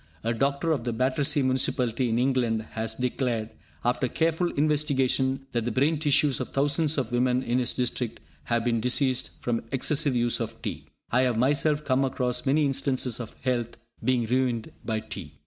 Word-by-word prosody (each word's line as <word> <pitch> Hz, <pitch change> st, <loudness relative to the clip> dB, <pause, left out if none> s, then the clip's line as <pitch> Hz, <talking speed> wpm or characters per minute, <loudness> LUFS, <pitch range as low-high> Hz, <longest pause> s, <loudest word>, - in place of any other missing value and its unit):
A 115 Hz, +1 st, 0 dB
doctor 140 Hz, +7 st, 0 dB
of 140 Hz, -7 st, 0 dB
the 120 Hz, -1 st, -2 dB
Battersea 135 Hz, +4 st, +1 dB
Municipality 130 Hz, -2 st, 0 dB
in 115 Hz, -, +1 dB
England 120 Hz, -3 st, +1 dB
has 110 Hz, 0 st, -4 dB
declared, 125 Hz, -3 st, -2 dB, 0.3 s
after 125 Hz, +1 st, +1 dB
careful 165 Hz, +5 st, 0 dB
investigation, 135 Hz, -3 st, +1 dB
that 120 Hz, -1 st, 0 dB
the 120 Hz, -, -2 dB
brain 145 Hz, +4 st, +2 dB
tissues 145 Hz, -2 st, +3 dB
of -, -, -4 dB
thousands 145 Hz, +2 st, +1 dB
of 125 Hz, -4 st, -1 dB
women 125 Hz, +1 st, +1 dB
in 120 Hz, +1 st, 0 dB
his 125 Hz, -, 0 dB
district 125 Hz, -2 st, -2 dB, 0.3 s
have 120 Hz, +5 st, 0 dB
been 115 Hz, -2 st, +1 dB
diseased 130 Hz, +1 st, +2 dB
from 120 Hz, -1 st, -1 dB
excessive 140 Hz, +1 st, +2 dB
use 120 Hz, 0 st, +1 dB
of -, -, -4 dB
tea. -, -, -5 dB, 0.2 s
I 125 Hz, -, +4 dB
have 125 Hz, -3 st, +1 dB
myself 145 Hz, +4 st, +2 dB
come 130 Hz, 0 st, +2 dB
across 125 Hz, -1 st, -1 dB
many 150 Hz, +3 st, +3 dB
instances 130 Hz, -3 st, 0 dB
of 120 Hz, -, -7 dB
health 120 Hz, -3 st, -1 dB, 0.3 s
being 125 Hz, -2 st, +2 dB
ruined 120 Hz, -1 st, 0 dB
by 110 Hz, -1 st, -2 dB
tea. 95 Hz, -8 st, -8 dB
130 Hz, 175 wpm, -26 LUFS, 120-140 Hz, 0.3 s, I